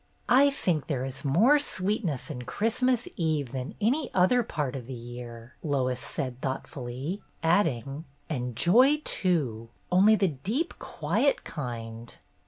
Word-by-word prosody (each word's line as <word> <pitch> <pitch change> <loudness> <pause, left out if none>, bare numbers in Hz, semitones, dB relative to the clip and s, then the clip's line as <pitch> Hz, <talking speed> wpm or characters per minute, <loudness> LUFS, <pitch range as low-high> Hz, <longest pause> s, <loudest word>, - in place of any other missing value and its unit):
"I 270 +3 +6
think 175 - -1
there 130 -4 -1
is 135 +1 -6
more 215 - +5
sweetness 190 - -2
in 125 - -5
Christ 225 - -1
mas 250 -1 +2
Eve 155 -7 0
than 130 +1 -5
any 255 +7 +1
other 190 +7 +4
part 150 - -3
of 125 -3 -6
the 130 - -5
year," 120 0 -9
Lois 130 -4 0
said 130 -1 -4
thoughtfully; 135 - -4 0.2
adding, 160 - +1 0.2
"and 125 -6 -3
joy, 255 - +5
too, 130 - 0 0.2
only 200 +4 +6
the 195 -3 +2
deep, 210 - -3
quiet - - 0
kind." 115 -5 -6
150 Hz, 140 wpm, -28 LUFS, 125-210 Hz, 0.2 s, I